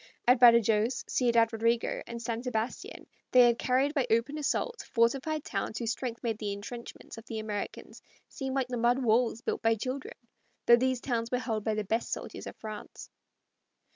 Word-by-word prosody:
At 250 0 +6
Badajoz, 235 0 +5
Ciudad 235 -2 +2
Rodrigo, 230 +1 0
and 235 0 -6
San 230 0 -3
Sebastian 240 -2 -4 0.3
they 255 - +7
had 235 -1 +4
carried 265 +3 +1
by 275 -5 0
open 235 +7 +1
assault 470 - -1
fortified 270 +6 0
towns 200 +2 -3
whose 230 -1 -1
strength 240 -1 -5
made 225 -3 -2
the 210 -2 -3
intrenchments 225 +2 -9
of 225 - -15
the 225 - -5
Americans 215 -2 -5 0.3
seem 265 0 -5
like 265 -2 0
the 245 - -2
mud 240 +2 +3
walls 230 0 +2
built - - -2
by 225 -1 +3
children, 255 +5 -5 0.5
though 235 - +8
these 255 0 0
towns 230 -3 -2
were 250 - 0
held 225 -4 -2
by 220 -1 0
the 215 - -1
best 225 +4 -2
soldiers - - -5
of - - -8
France. 215 -1 -9
235 Hz, 180 wpm, -29 LUFS, 225-255 Hz, 0.5 s, though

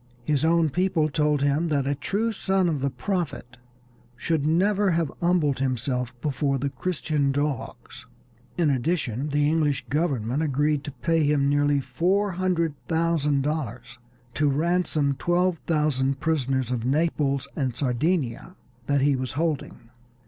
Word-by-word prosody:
His 145 +3 0
own 165 -1 +3
people 180 -2 +1
told 150 -1 +1
him 145 +4 +1
that 145 -4 0
a 140 - +1
true 205 +11 -1
son 190 -3 +1
of 155 -5 -1
the 140 - +1
Prophet 135 -3 -4 0.6
should 150 +3 -1
never 195 +5 +2
have 165 -4 0
humbled 170 -6 +2
himself 125 -2 -2
before 140 -1 0
the 140 +1 -2
Christian 150 -5 -1
dogs. 145 -1 -4 0.5
In 165 -4 +3
addition 140 -1 -1
the 145 0 +2
English 150 -3 +1
government 140 -4 0
agreed 145 0 +1
to 145 - -5
pay 160 +5 0
him 145 -1 +2
nearly 145 0 +2
four 190 +8 0
hundred 175 -3 0
thousand 160 -4 +1
dollars 125 -5 -4 0.3
to 145 +4 +2
ransom 155 -2 +1
twelve 175 -1 +1
thousand 140 -4 +1
prisoners 135 -5 0
of 120 -3 -1
Naples 140 -1 0
and 130 -5 -1
Sardinia 145 +3 -1 0.3
that 140 -1 +2
he 140 0 +3
was 130 -1 -3
holding. 145 -6 -3
150 Hz, 140 wpm, -25 LUFS, 135-165 Hz, 0.6 s, own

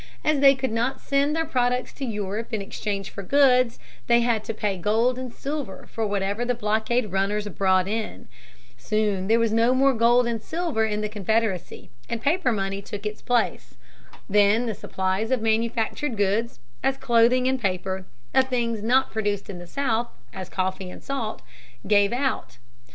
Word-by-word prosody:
As 305 -2 +3
they 275 0 +7
could 265 -1 -2
not 240 +4 -1
send 280 +2 +1
their 325 0 0
products 250 -4 0
to 275 - -5
Europe 210 -1 -3
to 220 - -2
exchange 195 0 -4
for - - -6
goods, 255 +1 +4 0.3
they 235 0 +5
had 235 -2 +1
to - - -2
pay 205 -3 -1
gold 225 +7 +1
and 255 -2 -5
silver 275 -7 -5
for 225 -1 -1
whatever 200 +2 -1
the 245 0 0
blockade 220 0 0
runners 200 +2 0
brought 185 -1 +2
in. 215 - -4 0.5
Soon 210 -3 0
there 225 +2 +4
was 230 -2 +1
no 230 +3 +3
more 270 +1 +4
gold 240 +1 +4
and 230 -2 -2
silver 320 -7 -1
in 210 0 -2
the 210 - -1
Confederacy, 210 -2 -2 0.2
and 235 - -2
paper 290 +3 +1
money 195 -2 -2
took 205 +1 -7
its 210 0 -4
place. 245 -1 -1 0.5
Then 210 +3 +4
the 225 - -2
supplies 190 +3 -2
of 255 -4 0
manufactured 225 +3 0
goods, 205 - 0 0.2
as 270 0 +1
clothing 250 0 +3
and 260 -1 0
paper, 190 -1 -2 0.3
of 265 - +5
things 235 -4 -1
not 255 +5 +2
produced 205 -2 -2
in 180 - -8
the 175 - -10
South, 240 +1 -1 0.2
as 185 -1 -7
coffee 185 0 -2
and - - -11
salt, 250 -6 -4 0.4
gave 205 0 +4
out. 245 - -2
225 Hz, 175 wpm, -25 LUFS, 205-250 Hz, 0.5 s, they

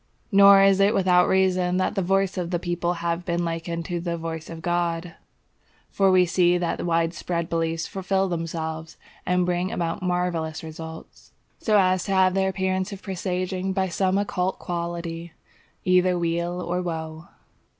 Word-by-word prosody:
Nor 200 0 +8
is 195 0 +4
it 200 +3 +4
without 180 -2 +4
reason 185 -1 +2
that 185 - 0
the 195 - -1
voice 195 +1 +1
of 180 -3 -3
the 175 - 0
people 175 0 -1
has 170 +1 0
been 175 -1 -1
likened 165 0 -4
to 175 -2 -3
the 170 0 -3
voice 160 -1 -6
of 165 -1 -8
God; 175 -1 -1 0.8
for 195 -1 +3
we 185 -1 +5
see 175 0 +3
that 175 -1 -2
wide 165 -1 +1
spread 170 0 -3
beliefs 165 0 -1
fulfil 195 +1 -1
themselves, 160 -2 -4 0.3
and 180 0 +2
bring 180 +1 -1
about 165 -1 -2
marvellous 180 -3 -2
results, 160 0 -10 0.3
so 215 -2 +2
as 185 -2 +3
to 195 - -1
have 185 -1 +4
the 190 0 +1
appearance 190 0 -1
of 200 -1 -9
presaging 185 0 -2
by 190 -1 0
some 190 +2 +1
occult 190 -2 -1
quality 170 -1 -5 0.5
either 180 0 +3
weal 170 +1 -1
or 175 +1 -2
woe. 160 -1 -5
180 Hz, 165 wpm, -24 LUFS, 170-185 Hz, 0.8 s, Nor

